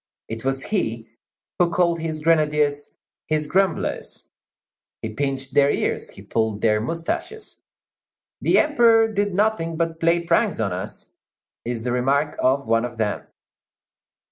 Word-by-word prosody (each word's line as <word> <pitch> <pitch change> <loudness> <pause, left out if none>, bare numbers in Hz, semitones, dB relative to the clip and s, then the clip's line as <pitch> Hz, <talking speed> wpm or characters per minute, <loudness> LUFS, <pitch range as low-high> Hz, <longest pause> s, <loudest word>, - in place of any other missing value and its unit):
It 115 0 -6
was 135 0 -1
he 115 - -2 0.5
who 175 -1 +4
called 170 -1 +1
his 160 -1 -4
grenadiers 150 -2 +1 0.3
"his 155 -1 0
grumblers"; 190 +2 -1 0.8
he 110 -1 -4
pinched 135 +1 -3
their 140 0 +5
ears; - - -1
he - - -13
pulled 110 -2 -1
their 105 -1 +3
moustaches. 165 - -4 0.8
"The - - +3
Emperor 235 -7 +4
did 205 -2 0
nothing 195 -6 0
but 165 -1 -1
play 170 +1 +3
pranks 170 -6 +1
on 100 -5 0
us," 90 +1 -6 0.5
is 120 -1 -3
the 125 - -1
remark 140 +4 +1
of 135 0 +1
one 115 +1 +2
of 120 -1 -5
them. 110 -2 -2
150 Hz, 140 wpm, -23 LUFS, 120-170 Hz, 0.8 s, their